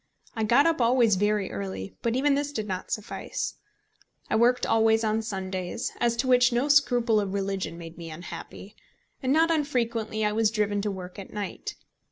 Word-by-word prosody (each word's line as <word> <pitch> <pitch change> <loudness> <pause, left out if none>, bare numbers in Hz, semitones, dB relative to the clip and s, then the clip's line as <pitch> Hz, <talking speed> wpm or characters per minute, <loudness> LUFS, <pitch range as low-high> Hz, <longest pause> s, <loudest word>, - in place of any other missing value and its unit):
I 220 - -1
got 240 +7 +4
up 330 -5 +2
always 235 -3 +4
very 205 0 0
early; 95 -1 -5
but 235 0 0
even 280 +2 +3
this 285 +1 -1
did 215 -7 -4
not 185 -2 -4
suffice. 215 - -4 0.8
I - - +3
worked 240 +3 +3
always 225 0 +3
on 220 0 +1
Sundays, 190 -1 -4
as 235 -1 +2
to 250 +3 -1
which 250 0 +5
no 245 +5 +1
scruple 245 -6 +4
of 200 -1 -2
religion 195 -3 -2
made 165 0 -10
me 165 -1 -7
unhappy, 175 +5 -9 0.5
and 260 -1 0
not 325 +3 +4
unfrequently 235 -8 0
I 210 - +2
was 220 0 +2
driven 210 -2 0
to 210 - -1
work 185 0 -7
at 195 - -9
night. 205 -2 -5
220 Hz, 185 wpm, -27 LUFS, 195-245 Hz, 0.8 s, which